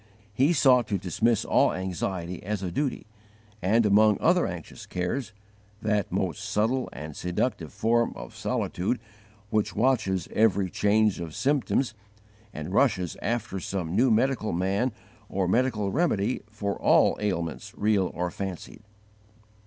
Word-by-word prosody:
He 135 Hz, +9 st, +3 dB
sought 130 Hz, -7 st, +4 dB
to 100 Hz, -, 0 dB
dismiss 105 Hz, +4 st, +1 dB
all -, -, +3 dB
anxiety, 90 Hz, -1 st, -3 dB
as 100 Hz, 0 st, -3 dB
a 90 Hz, -, -2 dB
duty; 135 Hz, +9 st, -2 dB, 0.6 s
and, 110 Hz, +5 st, +3 dB
among 105 Hz, 0 st, +5 dB
other 175 Hz, +1 st, +3 dB
anxious 85 Hz, -4 st, -8 dB
cares, 95 Hz, +6 st, -3 dB, 0.5 s
that 105 Hz, -2 st, 0 dB
most 95 Hz, +1 st, -2 dB
subtle 110 Hz, +5 st, 0 dB
and 75 Hz, -1 st, -8 dB
seductive 90 Hz, -1 st, -2 dB
form 115 Hz, +1 st, +1 dB
of -, -, -9 dB
solicitude 95 Hz, +8 st, -1 dB, 0.5 s
which 105 Hz, -1 st, 0 dB
watches 110 Hz, -8 st, +1 dB
every 100 Hz, -4 st, +2 dB
change 105 Hz, -1 st, +2 dB
of 80 Hz, -2 st, -6 dB
symptoms 135 Hz, -3 st, +1 dB, 0.6 s
and 75 Hz, +4 st, -6 dB
rushes 95 Hz, -, +2 dB
after 115 Hz, -3 st, -2 dB
some 90 Hz, -2 st, -3 dB
new 125 Hz, +5 st, +4 dB
medical 115 Hz, -2 st, +1 dB
man 95 Hz, +8 st, 0 dB, 0.4 s
or 95 Hz, -1 st, 0 dB
medical 110 Hz, -1 st, +1 dB
remedy 130 Hz, -, +1 dB
for 105 Hz, -2 st, -3 dB
all -, -, +5 dB
ailments 90 Hz, -6 st, -3 dB
real 105 Hz, -3 st, +2 dB
or 90 Hz, 0 st, -2 dB
fancied. 95 Hz, +1 st, -6 dB
105 Hz, 135 wpm, -27 LUFS, 90-115 Hz, 0.6 s, among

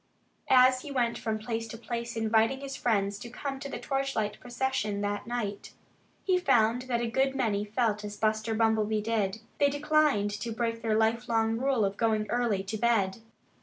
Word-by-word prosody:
As 255 Hz, 0 st, +6 dB
he 295 Hz, -, -8 dB
went 245 Hz, -4 st, 0 dB
from 220 Hz, -1 st, -2 dB
place 225 Hz, 0 st, -4 dB
to 225 Hz, -, -8 dB
place 235 Hz, 0 st, -5 dB
inviting 225 Hz, +4 st, +2 dB
his 275 Hz, -1 st, -5 dB
friends 200 Hz, -5 st, 0 dB
to 235 Hz, -, -8 dB
come 270 Hz, +2 st, -5 dB
to 280 Hz, 0 st, -6 dB
the -, -, -4 dB
torchlight 270 Hz, -7 st, -2 dB
procession 245 Hz, -4 st, -2 dB
that 205 Hz, +1 st, -2 dB
night, 220 Hz, -4 st, -4 dB, 0.5 s
he 370 Hz, -2 st, +2 dB
found 235 Hz, -7 st, +3 dB
that 240 Hz, -2 st, 0 dB
a -, -, 0 dB
good 265 Hz, +3 st, +1 dB
many 220 Hz, -6 st, 0 dB
felt 210 Hz, -1 st, 0 dB
as 205 Hz, 0 st, -6 dB
Buster 220 Hz, +1 st, 0 dB
Bumblebee 220 Hz, -1 st, +2 dB
did. 215 Hz, -1 st, -1 dB, 0.2 s
They 285 Hz, -, +5 dB
declined 290 Hz, -7 st, +2 dB
to 210 Hz, +3 st, -4 dB
break 230 Hz, 0 st, -2 dB
their 220 Hz, -1 st, +1 dB
life 230 Hz, +2 st, +1 dB
long 225 Hz, -1 st, +2 dB
rule 260 Hz, -5 st, +2 dB
of 195 Hz, 0 st, -3 dB
going 220 Hz, -2 st, +1 dB
early 235 Hz, -5 st, +1 dB
to 205 Hz, +3 st, -4 dB
bed. 220 Hz, -4 st, +2 dB
230 Hz, 185 wpm, -29 LUFS, 215-250 Hz, 0.5 s, As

